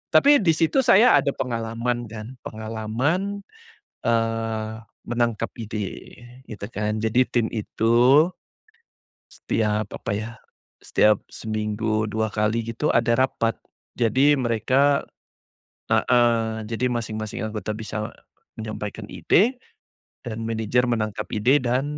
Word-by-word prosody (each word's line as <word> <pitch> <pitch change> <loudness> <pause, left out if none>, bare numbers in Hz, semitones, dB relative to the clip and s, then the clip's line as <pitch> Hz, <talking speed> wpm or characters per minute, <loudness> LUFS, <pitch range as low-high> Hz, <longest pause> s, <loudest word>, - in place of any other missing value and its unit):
tapi 285 0 +7
disitu 165 - +2
saya 235 0 +6
ada 140 - 0
pengalaman 120 0 -2
kan, 115 +4 -9
pengalaman 115 - -2 0.6
eee, 115 -1 -1 0.3
menangkap 120 -1 0
ide 110 -4 -6 0.3
gitu 100 -2 -6
kan 105 +1 -1
jadi 110 +3 +3
tim 120 -2 +1
itu, 120 +7 +4 1.0
setiap 105 -2 -1
apa - - -5
ya, 110 +2 -5 0.5
setiap 105 -1 +3
seminggu 110 0 -2
2 110 +1 -1
kali 110 +2 0
gitu 115 +6 -2
ada 120 0 +3
rapat 120 -3 +1 0.4
jadi 130 +5 +4
mereka 130 +4 +2 0.9
heeh, 115 -2 +2
jadi 120 +2 0
masing-masing 110 -2 -4
anggota 110 0 -4
bisa 110 -1 -4 0.5
menyampaikan 110 -1 -5
ide 240 +7 +2 0.7
dan 115 -1 -4
manajer 115 +2 +1
menangkap 110 -3 -1
ide 120 +7 +4
dan 125 +3 +1
115 Hz, 105 wpm, -24 LUFS, 110-125 Hz, 1.0 s, tapi